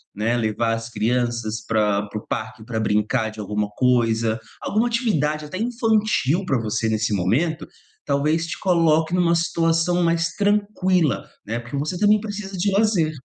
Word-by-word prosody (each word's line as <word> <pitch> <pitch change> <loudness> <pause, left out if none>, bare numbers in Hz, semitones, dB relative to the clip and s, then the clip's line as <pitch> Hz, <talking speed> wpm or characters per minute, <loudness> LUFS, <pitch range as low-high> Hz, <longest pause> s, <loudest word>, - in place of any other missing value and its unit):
né. 115 +4 0
Levar 115 0 0
as 115 +1 -4
crianças 120 -1 -1
pra 105 -2 +1
para 105 +1 -5
o - - -22
parque 110 0 -5
pra 115 -2 -3
brincar 105 +1 +1
de 110 - -12
alguma 105 0 -2
coisa, 115 -2 +2 0.2
alguma 220 +4 +1
atividade, 155 - 0
até 165 +5 -6
infantil 215 - +1
pra 135 -7 +1
você 110 0 -1
nesse 110 0 0
momento, 140 - 0 0.4
talvez 150 +4 +1
te 160 - -5
coloque 165 -3 +2
numa 175 -2 +3
situação 170 +1 +1
mais 165 0 +1
tranquila, 190 - +1 0.2
né, 115 +3 -3
porque 120 +3 -8
você 150 +6 -2
também 210 +2 +4
precisa 205 -2 -6
de 200 +3 +1
lazer. 195 -6 +2
150 Hz, 160 wpm, -22 LUFS, 110-180 Hz, 0.4 s, também